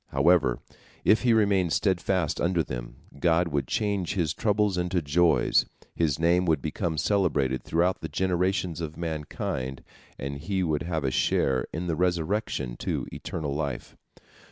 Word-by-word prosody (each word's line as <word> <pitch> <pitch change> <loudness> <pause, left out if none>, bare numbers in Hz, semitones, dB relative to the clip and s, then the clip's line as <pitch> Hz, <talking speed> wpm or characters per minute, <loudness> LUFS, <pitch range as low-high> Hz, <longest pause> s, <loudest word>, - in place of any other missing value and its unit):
However, 70 -2 +3 0.5
if 105 -1 +5
he 120 - +3
remained 100 -6 +3
steadfast 95 -4 0
under 85 -1 +2
them, - - -6 0.2
God 85 +1 +2
would 70 -4 -1
change 100 -4 -1
his 80 -5 0
troubles 105 -2 +1
into 90 0 0
joys, 80 -2 +3 0.3
his 80 -5 +1
name 85 +3 +3
would 80 -3 +3
become 80 +2 -3
celebrated 75 -10 +1
throughout 90 +3 0
the - - -5
generations 90 -2 0
of 80 -1 -5
mankind, 75 -5 -4 0.3
and 70 +1 -5
he 95 +4 -1
would 75 -4 0
have 80 -1 -2
a 65 - 0
share 65 0 +1
in 85 +3 -4
the 85 -2 -1
resurrection 85 - -1
to - - -2
eternal 75 -4 -4
life. 70 -3 -4
85 Hz, 150 wpm, -27 LUFS, 70-90 Hz, 0.5 s, if